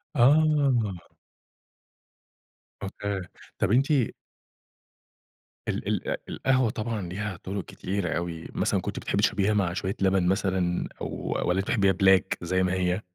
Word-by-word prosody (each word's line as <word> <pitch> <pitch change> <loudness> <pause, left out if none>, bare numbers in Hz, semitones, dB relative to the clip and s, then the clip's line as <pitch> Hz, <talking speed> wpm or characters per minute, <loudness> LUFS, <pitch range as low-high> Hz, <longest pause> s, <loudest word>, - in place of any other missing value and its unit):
آه. 135 - +3 1.7
أوكي. 100 0 -3 0.4
طيب - - +2
أنتِ 130 +4 +4 1.8
ال - - -2
ال - - -1
القهوة 130 -3 +2
طبعًا 110 0 -3
ليها 105 0 -4
طرق 95 0 -4
كتيرة 95 -2 -3
أوي، 85 -1 -4
مثلًا - - +1
كنتِ - - -4
بتحبي - - -1
تشربيها 105 +1 +2
مع 95 -4 +1
شويّة 95 +1 -2
لبن 95 -2 +3
مثلًا، 95 -2 0
أو - - -2 0.4
والّا 90 +2 +2
أنتِ 95 - -1
بتحبيها 100 -5 +3
black 95 -1 +6 0.2
زي 95 +2 +1
ما 90 0 +1
هي؟ 90 +1 0
95 Hz, 130 wpm, -27 LUFS, 95-110 Hz, 1.8 s, black